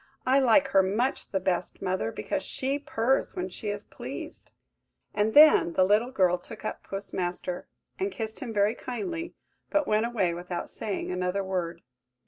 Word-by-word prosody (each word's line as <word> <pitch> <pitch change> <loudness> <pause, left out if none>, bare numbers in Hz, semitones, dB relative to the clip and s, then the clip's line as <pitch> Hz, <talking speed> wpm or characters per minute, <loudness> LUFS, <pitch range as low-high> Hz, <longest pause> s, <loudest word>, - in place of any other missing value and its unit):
I 265 +2 +5
like 270 +2 +4
her 195 -6 +5
much 215 +8 0
the 190 - 0
best, 185 -1 -1
mother, 185 -12 -1
because 105 - -3
she 270 +8 -2
purrs 270 -3 0
when 185 +1 -3
she 205 +3 -5
is 205 0 -4
pleased!" - - -8 0.6
And 215 +1 +1
then 300 - +8
the 185 - +4
little 210 +6 +3
girl 185 -8 +2
took 220 +5 -10
up - - -4
Puss 195 +1 -6
Master, 180 0 -3 0.3
and 385 +1 0
kissed 220 - -4
him 260 -6 -5
very 205 0 +2
kindly, 330 +8 -5 0.3
but 300 0 +2
went 215 +2 +2
away 200 -8 0
without 175 0 -5
saying 200 -4 -3
another 180 +2 -1
word. 175 -3 -3
205 Hz, 170 wpm, -28 LUFS, 185-255 Hz, 0.6 s, then